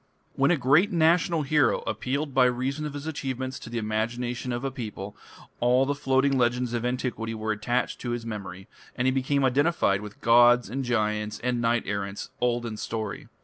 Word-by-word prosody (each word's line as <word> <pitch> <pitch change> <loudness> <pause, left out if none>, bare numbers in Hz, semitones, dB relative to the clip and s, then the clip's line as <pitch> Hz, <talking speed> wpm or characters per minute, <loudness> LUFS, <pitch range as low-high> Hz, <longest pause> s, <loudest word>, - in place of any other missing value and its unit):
When 140 +1 +2
a 175 - +3
great 145 - +4
national 165 -1 +3
hero 145 0 +2
appealed 140 +2 -2
by 130 -1 +5
reason 130 +5 -1
of 145 - -8
his 145 +1 -6
achievements 130 -4 -4
to - - -10
the 120 - -4
imagination 120 +3 -2
of 120 +1 -3
a 135 - -2
people, 105 -6 -7 0.4
all 125 +2 +3
the 145 - 0
floating 135 -1 +1
legends 120 0 +1
of 120 -1 -1
antiquity 125 -2 -2
were 110 0 -2
attached 115 +4 -1
to 120 - -4
his 120 -1 -3
memory, 95 -4 -7 0.3
and 125 - -1
he 130 - +4
became 135 +1 +1
identified 130 - +2
with 105 -1 -10
gods 120 -1 +5
and 135 +2 -2
giants 105 -3 -1
and 125 -1 0
knight 120 0 +1
errants 100 0 -4
"old 120 -1 +1
in 110 -2 -5
story". 110 -1 -4
125 Hz, 190 wpm, -26 LUFS, 115-135 Hz, 0.4 s, by